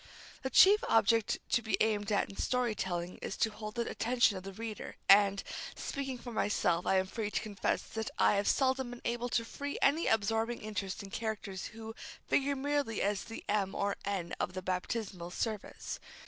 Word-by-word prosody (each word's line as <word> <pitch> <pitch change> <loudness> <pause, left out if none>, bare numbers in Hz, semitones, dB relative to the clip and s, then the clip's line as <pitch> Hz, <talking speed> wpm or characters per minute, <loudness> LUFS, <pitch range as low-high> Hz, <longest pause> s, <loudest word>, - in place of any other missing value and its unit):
The 265 - -2
chief 400 - +7
object 225 0 +4
to 240 - +4
be 220 - 0
aimed 215 -1 +1
at 205 - +2
in 195 - -11
story 250 0 +1
telling 175 -3 -3
is - - -5
to 220 - +2
hold 215 +1 -7
the 235 -1 -1
attention 240 -2 +2
of 185 - -5
the 195 +1 -7
reader, 220 +2 -6
and, 200 0 +6 0.3
speaking 270 -2 -4
for 240 0 -8
myself, 180 -6 +1
I - - +4
am 190 0 +3
free 210 +2 -3
to - - 0
confess 205 -2 -1
that 220 -1 -4
I - - +5
have 200 0 +1
seldom 265 -2 +2
been 245 0 -9
able 240 +1 -1
to 230 -1 +1
feel 285 +4 -5
any 305 +5 +3
absorbing 225 +2 +1
interest 205 -2 -4
in 195 - -10
characters 210 -4 -3
who 225 0 -8 0.3
figure 280 0 +2
merely 280 -5 0
as 200 0 0
the 225 - -8
M. 200 -2 0
or 200 0 0
N. 190 -4 -2
of - - -1
the 185 0 -5
baptismal 185 -1 -3
service. 215 +2 -4
220 Hz, 190 wpm, -33 LUFS, 195-240 Hz, 0.3 s, chief